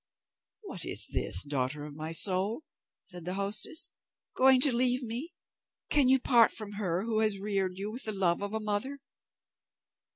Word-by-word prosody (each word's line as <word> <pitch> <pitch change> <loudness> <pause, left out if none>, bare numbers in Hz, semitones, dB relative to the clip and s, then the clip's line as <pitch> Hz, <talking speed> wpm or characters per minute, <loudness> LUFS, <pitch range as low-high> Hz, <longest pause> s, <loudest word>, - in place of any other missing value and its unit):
"What - - -6
is - - -2
this, 90 - +3
daughter 145 +1 -3
of 150 - -10
my 155 +1 -6
soul?" 195 - +3 0.4
said 175 -3 -10
the 180 +2 -5
hostess; 200 +10 -1 0.4
"Going 260 0 +5
to 275 -2 +4
leave 250 +1 +2
me? 245 +9 -6 0.6
Can 280 -4 +3
you 265 0 +4
part 240 -3 +4
from 215 -2 -5
her 190 -3 -3
who 225 -1 -1
has 215 -2 +2
reared 195 -2 -3
you 200 +2 -5
with 245 +4 -3
the 215 - 0
love 190 -4 0
of 205 +1 -4
a - - -1
mother?" 215 +6 -3
205 Hz, 170 wpm, -29 LUFS, 185-245 Hz, 0.6 s, Going